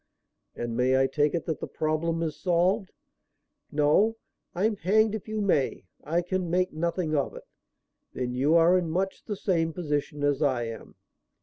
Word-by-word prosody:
"And 120 Hz, -1 st, -4 dB
may 130 Hz, +2 st, +3 dB
I 135 Hz, -, +4 dB
take 145 Hz, +3 st, +1 dB
it 170 Hz, -, -2 dB
that 160 Hz, -, -2 dB
the -, -, -5 dB
problem 165 Hz, +2 st, -1 dB
is 155 Hz, -2 st, -2 dB
solved?" 185 Hz, +3 st, +1 dB, 0.8 s
"No, 155 Hz, +10 st, +3 dB, 0.4 s
I'm 210 Hz, +4 st, +1 dB
hanged 215 Hz, +5 st, +3 dB
if 220 Hz, -1 st, -5 dB
you 215 Hz, 0 st, -2 dB
may. 180 Hz, -9 st, 0 dB, 0.2 s
I 170 Hz, +3 st, 0 dB
can 180 Hz, 0 st, -2 dB
make 185 Hz, +2 st, +1 dB
nothing 165 Hz, 0 st, -1 dB
of 140 Hz, -2 st, -1 dB
it." -, -, -9 dB, 0.7 s
"Then 125 Hz, -1 st, -3 dB
you 140 Hz, +6 st, +2 dB
are 170 Hz, +2 st, +6 dB
in 170 Hz, -2 st, -3 dB
much 190 Hz, +4 st, -2 dB
the 210 Hz, -, -3 dB
same 165 Hz, -5 st, 0 dB
position 150 Hz, -3 st, -2 dB
as 145 Hz, 0 st, +1 dB
I 130 Hz, -5 st, +1 dB
am." 115 Hz, -1 st, -8 dB
165 Hz, 175 wpm, -27 LUFS, 145-185 Hz, 0.8 s, are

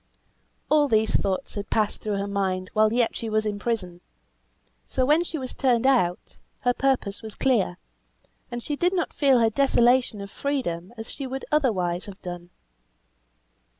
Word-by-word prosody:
All 300 Hz, -1 st, +4 dB
these 220 Hz, -3 st, +2 dB
thoughts 195 Hz, +6 st, -1 dB
had 200 Hz, -1 st, -5 dB
passed 215 Hz, -2 st, 0 dB
through 210 Hz, -2 st, -2 dB
her 200 Hz, -, -2 dB
mind 190 Hz, -2 st, -2 dB
while 215 Hz, 0 st, +4 dB
yet 235 Hz, 0 st, +1 dB
she 225 Hz, -, -4 dB
was 215 Hz, 0 st, +1 dB
in 205 Hz, -1 st, -2 dB
prison; 185 Hz, -7 st, -3 dB, 0.9 s
so 255 Hz, -, 0 dB
when 305 Hz, +5 st, +4 dB
she 330 Hz, -2 st, -5 dB
was 260 Hz, -3 st, -5 dB
turned 250 Hz, -3 st, +2 dB
out, 230 Hz, -10 st, +1 dB, 0.2 s
her 245 Hz, -, +2 dB
purpose 255 Hz, -7 st, 0 dB
was 220 Hz, -2 st, -9 dB
clear, 220 Hz, -9 st, +1 dB, 0.7 s
and 240 Hz, -1 st, -5 dB
she 295 Hz, -, -2 dB
did 355 Hz, +5 st, +1 dB
not 350 Hz, -, -1 dB
feel 275 Hz, -3 st, +4 dB
her 225 Hz, -2 st, +3 dB
desolation 245 Hz, -2 st, +3 dB
of 200 Hz, 0 st, -7 dB
freedom 215 Hz, -11 st, -3 dB
as 225 Hz, 0 st, -6 dB
she 275 Hz, -2 st, -5 dB
would 265 Hz, +1 st, -5 dB
otherwise 195 Hz, -, +1 dB
have 200 Hz, -1 st, -10 dB
done. 175 Hz, -1 st, -7 dB
225 Hz, 170 wpm, -25 LUFS, 200-265 Hz, 0.9 s, All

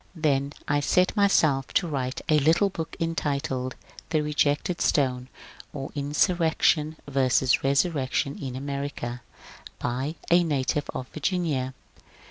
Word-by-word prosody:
Then 140 Hz, -3 st, 0 dB
I 145 Hz, 0 st, +2 dB
set 180 Hz, +7 st, +2 dB
myself 155 Hz, -, +3 dB
to 180 Hz, -, +3 dB
write 130 Hz, -4 st, -3 dB
the 155 Hz, -1 st, +4 dB
little 165 Hz, +7 st, +3 dB
book 160 Hz, -2 st, -5 dB
entitled 140 Hz, -6 st, -2 dB, 0.3 s
^' -, -, -34 dB
The 155 Hz, -2 st, +1 dB
Rejected 150 Hz, +3 st, 0 dB
Stone: 130 Hz, -3 st, +1 dB, 0.4 s
or 135 Hz, -2 st, -5 dB
Insurrection 155 Hz, +1 st, +2 dB
vs. 130 Hz, -2 st, +2 dB
Resurrection 140 Hz, -1 st, +1 dB
in 130 Hz, -3 st, -5 dB
America. 140 Hz, -3 st, -4 dB, 0.6 s
By 130 Hz, +6 st, -2 dB, 0.2 s
a 175 Hz, +1 st, +6 dB
Native 145 Hz, -2 st, -1 dB
of 125 Hz, -, -4 dB
Virginia." 150 Hz, -6 st, -1 dB
145 Hz, 120 wpm, -26 LUFS, 135-160 Hz, 0.6 s, a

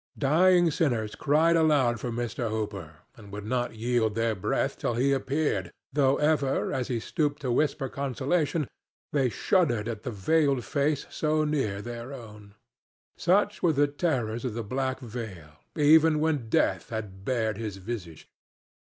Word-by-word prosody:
Dying 175 Hz, +4 st, +4 dB
sinners 120 Hz, -9 st, 0 dB
cried 160 Hz, +3 st, +3 dB
aloud 145 Hz, -8 st, +3 dB
for 120 Hz, -, -4 dB
Mr. 120 Hz, 0 st, -3 dB
Hooper 100 Hz, -8 st, -5 dB
and 105 Hz, -5 st, -13 dB
would 105 Hz, 0 st, -7 dB
not 120 Hz, +1 st, -1 dB
yield 110 Hz, -1 st, 0 dB
their 115 Hz, 0 st, +1 dB
breath 95 Hz, -, -1 dB
till 120 Hz, -, -1 dB
he 135 Hz, +4 st, +2 dB
appeared, 135 Hz, -, -1 dB, 0.2 s
though 140 Hz, -1 st, +3 dB
ever, 150 Hz, -3 st, +1 dB
as 130 Hz, -2 st, -1 dB
he 125 Hz, -3 st, -1 dB
stooped 150 Hz, +3 st, -1 dB
to 125 Hz, -, 0 dB
whisper 135 Hz, +1 st, +1 dB
consolation, 140 Hz, +3 st, -1 dB, 0.5 s
they 135 Hz, -4 st, +2 dB
shuddered 120 Hz, -, +1 dB
at 110 Hz, -3 st, -4 dB
the -, -, -4 dB
veiled 135 Hz, +4 st, +1 dB
face 145 Hz, 0 st, 0 dB
so 155 Hz, 0 st, +1 dB
near 135 Hz, -10 st, -1 dB
their 120 Hz, +2 st, -7 dB
own. 105 Hz, -5 st, -11 dB, 0.6 s
Such 205 Hz, +4 st, +2 dB
were 170 Hz, -3 st, +3 dB
the 145 Hz, 0 st, +4 dB
terrors 130 Hz, -7 st, -1 dB
of 125 Hz, -4 st, -3 dB
the 115 Hz, -, -3 dB
black 130 Hz, +4 st, -2 dB
veil 110 Hz, -, -7 dB, 0.2 s
even 155 Hz, +1 st, +5 dB
when 150 Hz, -7 st, 0 dB
Death 95 Hz, -4 st, +1 dB
had 105 Hz, -4 st, -6 dB
bared 110 Hz, -2 st, -1 dB
his 105 Hz, -4 st, -4 dB
visage. 95 Hz, -6 st, -7 dB
125 Hz, 155 wpm, -27 LUFS, 110-150 Hz, 0.6 s, even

